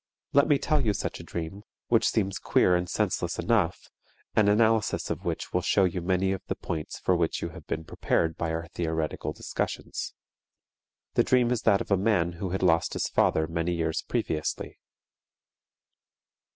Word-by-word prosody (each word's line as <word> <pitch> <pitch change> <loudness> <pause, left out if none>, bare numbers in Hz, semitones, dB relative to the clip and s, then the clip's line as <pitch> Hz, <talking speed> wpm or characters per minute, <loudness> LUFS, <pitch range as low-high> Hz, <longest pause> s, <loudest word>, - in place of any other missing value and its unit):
Let 140 0 +5
me 145 - +4
tell 150 0 +1
you 105 -3 +2
such - - -3
a - - -8
dream, 85 +4 -5 0.3
which 115 -2 +4
seems 100 -3 0
queer 90 - +3
and 90 0 -1
senseless - - -1
enough, 105 -7 0 0.4
and 105 -2 +5
analysis 110 0 +2
of - - -4
which - - -3
will 90 - +2
show 95 +2 +3
you 90 -1 0
many 95 +2 +1
of 95 - -2
the - - -1
points 80 -3 -5
for 90 - +1
which 85 -2 0
you - - -2
have - - -12
been 80 - -3
prepared 80 0 0
by 80 - -2
our 85 +1 -3
theoretical 80 -2 -2
discussions. - - -4 1.0
The - - +4
dream 125 -2 +3
is 125 - 0
that 100 -2 +4
of - - -6
a 100 - +5
man 95 -4 +2
who 95 - -1
had 95 +1 -2
lost 85 -2 +3
his - - -1
father 80 - +2
many 85 +2 -1
years 80 -1 -1
previously. 75 -1 -3
90 Hz, 180 wpm, -27 LUFS, 85-105 Hz, 1.0 s, Let